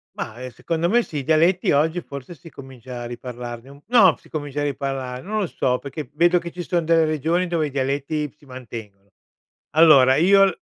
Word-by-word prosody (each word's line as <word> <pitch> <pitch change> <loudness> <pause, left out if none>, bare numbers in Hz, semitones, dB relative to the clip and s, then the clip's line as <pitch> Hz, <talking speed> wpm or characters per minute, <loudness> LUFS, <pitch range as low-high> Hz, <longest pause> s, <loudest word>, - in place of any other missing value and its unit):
Mah, 120 +4 -6
ehm, 130 - -5
secondo 165 +5 -2
me 240 +3 +4
sì, 155 - -7
i 140 - -3
dialetti 165 +5 +2
oggi 160 +4 +2
forse 140 +4 -9
si 155 +3 -15
comincia 130 -2 -10
a - - -6
riparlarn 120 +2 -8
no, 215 -9 +6
si - - -22
comincia 145 -2 -5
a - - 0
riparlarne. 135 -1 -4
Non 215 +1 -1
lo 195 - -1
so, 125 -4 -1
perché 140 0 -7
vedo 175 +3 +3
che 170 -1 -5
ci 180 - -7
son 175 -1 -1
delle 165 -1 +4
regioni 160 +4 0
dove 165 -3 0
i - - -9
dialetti 140 +2 -2
si 150 - -22
mantengono. 110 -6 -10 0.6
Allora, 140 -4 +6
io 195 +2 +4
145 Hz, 195 wpm, -22 LUFS, 130-170 Hz, 0.6 s, no